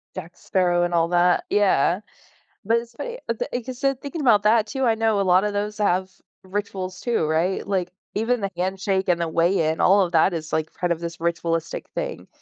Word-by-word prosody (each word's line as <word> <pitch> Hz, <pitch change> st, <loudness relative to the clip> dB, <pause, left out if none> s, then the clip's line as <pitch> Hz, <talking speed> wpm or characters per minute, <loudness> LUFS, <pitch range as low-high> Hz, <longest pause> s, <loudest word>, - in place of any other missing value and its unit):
Jack 175 Hz, -1 st, -8 dB
Sparrow 175 Hz, -2 st, +1 dB
and 175 Hz, 0 st, -1 dB
all 165 Hz, -1 st, +3 dB
that 175 Hz, 0 st, +3 dB
yeah. 190 Hz, -3 st, +2 dB, 0.6 s
But, 225 Hz, +3 st, +3 dB
it's 235 Hz, 0 st, -11 dB
funny -, -, -6 dB
but, -, -, -2 dB
the -, -, -2 dB
like 245 Hz, 0 st, -3 dB
I -, -, -1 dB
said, 270 Hz, +1 st, -1 dB
thinking 295 Hz, +3 st, -5 dB
about 225 Hz, -7 st, +4 dB
that, 220 Hz, +1 st, +4 dB
too, 265 Hz, +3 st, -3 dB
I 230 Hz, -2 st, +3 dB
know 220 Hz, -2 st, +1 dB
a -, -, +2 dB
lotta 190 Hz, +3 st, +3 dB
those 205 Hz, +1 st, -3 dB
have 190 Hz, -2 st, +1 dB, 0.3 s
rituals 190 Hz, -1 st, -4 dB
too, 235 Hz, -9 st, 0 dB
right? 165 Hz, +5 st, 0 dB
Like, 185 Hz, -3 st, -1 dB, 0.2 s
even 230 Hz, +2 st, 0 dB
the 195 Hz, -1 st, -2 dB
handshake, 190 Hz, +1 st, -1 dB
and 170 Hz, -1 st, +2 dB
the 170 Hz, -, 0 dB
weigh-in, 165 Hz, -1 st, +1 dB
all 200 Hz, +2 st, +5 dB
of 180 Hz, -3 st, 0 dB
that 165 Hz, +3 st, +4 dB
is, 160 Hz, -2 st, -5 dB
like, 160 Hz, 0 st, -1 dB
part 175 Hz, -1 st, -2 dB
of 170 Hz, -, 0 dB
this 170 Hz, -1 st, -6 dB
ritualistic 170 Hz, -1 st, -2 dB
thing, -, -, -4 dB
190 Hz, 215 wpm, -23 LUFS, 170-215 Hz, 0.6 s, all